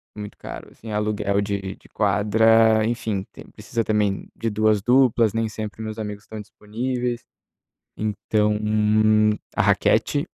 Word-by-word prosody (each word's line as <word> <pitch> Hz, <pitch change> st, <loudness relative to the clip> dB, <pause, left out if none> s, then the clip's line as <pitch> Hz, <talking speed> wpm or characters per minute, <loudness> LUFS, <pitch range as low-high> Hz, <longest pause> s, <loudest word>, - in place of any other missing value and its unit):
muito 105 Hz, -1 st, -8 dB
caro, -, -, -9 dB
assim, 110 Hz, -1 st, -10 dB
aluguel 105 Hz, -1 st, 0 dB
de 100 Hz, -2 st, -3 dB
de -, -, -22 dB
quadra, 110 Hz, +1 st, +3 dB
enfim, 110 Hz, -5 st, -2 dB
tem -, -, -13 dB
precisa 115 Hz, -1 st, -3 dB
também 105 Hz, -2 st, 0 dB
de 115 Hz, -, -2 dB
2 110 Hz, -1 st, +2 dB
duplas, 120 Hz, -2 st, +3 dB
nem 115 Hz, 0 st, 0 dB
sempre 110 Hz, +1 st, -7 dB
meus 110 Hz, 0 st, -6 dB
amigos 105 Hz, -1 st, -6 dB
estão 110 Hz, -, -9 dB
disponíveis. 120 Hz, +4 st, -4 dB, 0.7 s
Então 105 Hz, 0 st, 0 dB, 1.0 s
a -, -, +2 dB
raquete, -, -, +2 dB
110 Hz, 135 wpm, -23 LUFS, 105-115 Hz, 1.0 s, quadra